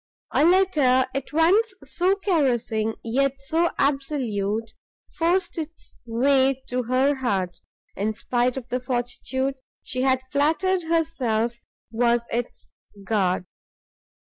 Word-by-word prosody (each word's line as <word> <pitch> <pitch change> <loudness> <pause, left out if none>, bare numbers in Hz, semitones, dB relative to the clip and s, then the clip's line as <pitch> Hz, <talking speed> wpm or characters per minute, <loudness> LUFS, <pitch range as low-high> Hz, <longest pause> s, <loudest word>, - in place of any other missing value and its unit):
A - - +3
letter 310 -8 +4
at 275 0 -4
once 385 +7 +3
so 370 +3 +1
caressing, 245 - 0
yet 270 +4 +1
so 325 +5 +1
absolute, 230 -7 -1 0.4
forced 345 +1 0
its 320 +1 -8
way 265 +2 +2
to 250 0 0
her 255 +4 +2
heart, 195 -10 -2 0.4
in 210 +3 -1
spite 245 +3 0
of 255 -2 -6
the 250 - -1
fortitude 255 +2 -2 0.3
she 255 - -3
had 260 -1 +2
flattered 325 +6 +2
herself 250 -9 0 0.3
was 235 0 +2
its 240 0 -4 0.3
guard. 190 -3 0
260 Hz, 115 wpm, -24 LUFS, 235-315 Hz, 0.4 s, letter